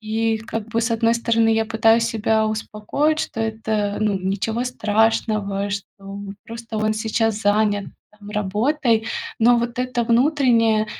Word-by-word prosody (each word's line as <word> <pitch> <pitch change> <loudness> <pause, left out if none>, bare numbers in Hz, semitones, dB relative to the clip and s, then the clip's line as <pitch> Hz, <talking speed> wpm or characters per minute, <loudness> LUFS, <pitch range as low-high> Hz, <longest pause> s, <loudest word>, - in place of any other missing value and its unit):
И 220 +1 -1
как 225 0 -6
бы, 230 0 0
с 230 0 0
одной 230 0 +2
стороны, 230 -1 +2
я 225 0 +1
пытаюсь 225 +1 +3
себя 220 -1 +1
успокоить, 220 +8 -1
что 225 - -3
это, 220 -2 -2
ну, 210 -2 +1
ничего 200 +5 -2
страшного, 215 -3 0
что 200 0 -7 0.2
просто 230 0 -7
он 215 0 +1
сейчас 220 0 -1
занят 205 -1 +1 0.3
там 205 0 -12
работой, 225 +4 0 0.3
но 240 +1 +5
вот 235 +1 -3
это 250 -2 -1
внутреннее, 235 -4 +3
225 Hz, 140 wpm, -21 LUFS, 210-230 Hz, 0.3 s, но